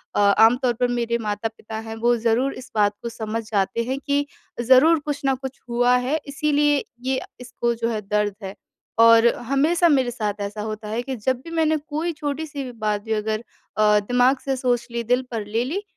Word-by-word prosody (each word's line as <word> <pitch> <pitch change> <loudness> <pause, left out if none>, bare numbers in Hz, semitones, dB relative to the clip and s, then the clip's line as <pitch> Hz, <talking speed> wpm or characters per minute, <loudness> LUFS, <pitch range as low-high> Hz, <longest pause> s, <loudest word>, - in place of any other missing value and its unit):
अ, - - +2
आमतौर 225 +5 +4
पर 245 - +3
मेरे 235 -1 -1
माता-पिता 220 0 -4
हैं 225 - -5
वो 240 +2 +2
ज़रूर 235 +4 +1
इस 255 0 -11
बात 205 -1 +3
को 235 - -4
समझ 225 0 -4
जाते 205 +3 0
हैं 260 +3 -3
कि 285 +1 0 0.4
ज़रूर 265 +7 +5
कुछ 295 -1 -3
न 270 -1 +3
कुछ 265 +1 -8
हुआ 245 +1 +3
है 310 +3 +1
इसीलिए 295 0 +1 0.3
ये 260 - +1 0.2
इसको 240 -1 -2
जो 230 0 -1
है 215 -2 -2
दर्द 210 0 -1
है। 195 +1 -6 0.4
और 230 0 +7 0.2
हमेशा 330 +5 +3
मेरे 260 -4 +2
साथ 210 -3 -3
ऐसा 205 +1 -4
होता 215 0 -5
है 225 +3 -2
कि 265 0 -4
जब 250 +3 -1
भी 330 - -9
मैंने 315 -1 +2
कोई 310 +3 -3
छोटी-सी 295 -1 -4
भी 250 - -7
बात 210 -1 0
भी 220 0 -2
अगर 215 +1 -2 0.3
अ, 210 -1 +5
दिमाग़ 245 +5 +2
से 270 -1 0
सोच 245 -1 0
ली 235 0 -2
दिल 245 +3 +2
पर 220 -3 -3
ले 225 +3 -1
ली, 380 +10 -3
240 Hz, 205 wpm, -23 LUFS, 220-275 Hz, 0.4 s, और